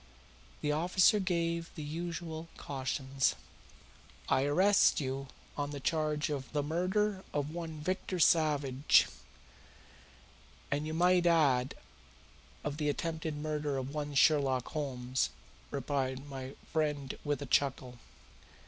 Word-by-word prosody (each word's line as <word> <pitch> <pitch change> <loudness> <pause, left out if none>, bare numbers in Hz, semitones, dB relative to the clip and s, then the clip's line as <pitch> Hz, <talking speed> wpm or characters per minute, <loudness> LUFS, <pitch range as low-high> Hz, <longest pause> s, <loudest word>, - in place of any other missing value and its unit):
The 150 - +1
officer 180 +6 +4
gave 170 -3 -1
the 155 - -5
usual 165 +1 -5
cautions. 135 0 -1 0.9
"I 135 - +3
arrest 190 +8 +4
you 135 -1 -3 0.3
on 145 -1 -2
the 145 -1 -5
charge 155 +1 0
of 135 -3 -4
the 145 -1 +1
murder 185 +5 0
of 145 0 -1
one 165 -2 -5
Victor 185 +2 -2
Savage," 150 -5 +3
he - - +10
concluded. - - -16 1.5
"And 145 +2 0
you 155 - -3
might 180 +1 +4
add 140 -7 +3 0.9
of 145 0 -3
the 150 -1 0
attempted 160 0 -2
murder 150 -2 -2
of 135 +1 -4
one 150 -1 -3
Sherlock 135 -3 +3
Holmes," 130 - -1 0.4
remarked 135 -1 -2
my 135 -1 -7 0.2
friend 150 -4 0
with 145 -1 -1
a - - -5
chuckle. 130 -2 0
150 Hz, 125 wpm, -32 LUFS, 135-165 Hz, 1.5 s, he